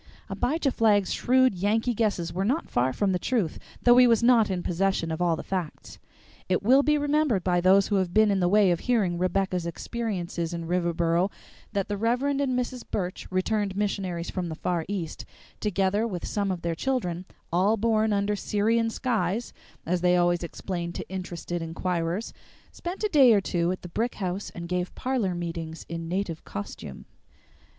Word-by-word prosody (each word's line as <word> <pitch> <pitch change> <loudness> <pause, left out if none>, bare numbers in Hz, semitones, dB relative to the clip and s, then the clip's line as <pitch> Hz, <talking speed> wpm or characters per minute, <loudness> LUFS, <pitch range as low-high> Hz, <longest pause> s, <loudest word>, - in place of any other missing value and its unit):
Abijah 290 +1 0
Flagg's 210 -5 +3
shrewd 260 -1 +3
Yankee 215 +6 +1
guesses 200 -7 -1
were 185 +2 -1
not 265 +11 -1
far 125 +2 +2
from 195 +9 0
the 180 - 0
truth, 210 -10 -1 0.2
though 240 0 +6
he 250 0 +8
was 230 0 +3
not 235 -3 +5
in 180 -2 -2
possession 180 -2 0
of 160 +2 -3
all 170 -2 +3
the - - -7
facts. 180 -5 -5 0.5
It 185 +1 +1
will 260 +6 +6
be 300 +1 +2
remembered 290 - +1
by 175 -1 +2
those 190 +2 +5
who 205 - +2
have 185 -2 0
been 215 +1 +4
in 195 - +1
the 175 - +2
way 205 -1 +5
of 170 - +1
hearing 200 -9 +1
Rebecca's 185 -1 0
experiences 175 -4 -3
in 170 -1 -5
Riverboro, 170 +1 +1 0.4
that 200 -2 -1
the 205 - -2
Rev. 235 +5 +1
and 280 -1 +1
Mrs. 250 -2 -1
Burch, 180 -2 -3
returned 195 +1 -1
missionaries 190 -4 -2
from 180 -3 -3
the 160 - -4
Far 170 0 -2
East, 180 -5 -4 0.4
together 205 +2 +1
with 180 -6 -5
some 200 -1 -1
of 180 -2 -3
their 170 0 0
children, 180 -5 -2 0.3
"all 195 +6 +3
born 220 0 +2
under 205 0 +1
Syrian 225 +3 +1
skies," 225 -2 -1 0.3
as 175 +1 0
they 180 0 +4
always 175 0 +2
explained 170 0 -5
to - - -5
interested 175 -2 -5
inquirers, 170 +4 -2 0.4
spent 355 +4 -6
a - - +3
day 270 - +7
or 205 - +5
two 175 -2 0
at 185 - -5
the - - -6
brick 230 +8 -2
house, 190 0 -3
and 170 0 -6
gave 180 +1 -2
parlor 245 -9 -1
meetings 165 -2 -5
in 165 0 -5
native 180 -3 -2
costume. 100 - -7
190 Hz, 185 wpm, -26 LUFS, 175-225 Hz, 0.5 s, he